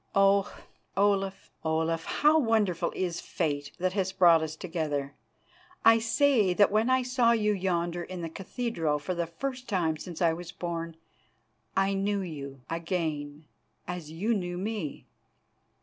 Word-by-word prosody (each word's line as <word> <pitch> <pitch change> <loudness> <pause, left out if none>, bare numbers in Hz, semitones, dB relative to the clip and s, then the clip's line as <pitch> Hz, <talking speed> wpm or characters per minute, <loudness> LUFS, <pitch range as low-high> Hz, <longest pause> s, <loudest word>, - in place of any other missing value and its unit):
Oh! 195 0 +4 0.5
Olaf, 195 -1 +1
Olaf, 160 +1 0
how 305 +2 +4
wonderful 220 - +1
is 175 -3 -1
the - - -16
fate 145 -2 -2
that 185 0 0
has 190 -2 0
brought 170 -4 +6
us 155 0 -3
together. 155 -5 -3 0.7
I 225 0 +8
say 225 -4 +3
that 205 +1 +5
when 215 +4 +2
I 260 0 +3
saw 250 -2 +3
you 210 -2 +2
yonder 175 -3 -1
in 175 0 -6
the - - -2
cathedral 180 -4 -2
for 150 +5 -3
the 170 -1 -2
first 255 +9 -5
time 170 -6 +1
since 170 +1 -8
I 170 -2 +3
was 175 +1 -7
born, 165 -2 -4 0.8
I 195 0 +3
knew 200 +1 0
you 140 -6 -7
again, 160 -3 -3 0.4
as 180 -4 -5
you 190 +9 0
knew 175 -4 -2
me. 195 -5 -4
180 Hz, 150 wpm, -29 LUFS, 165-205 Hz, 0.8 s, I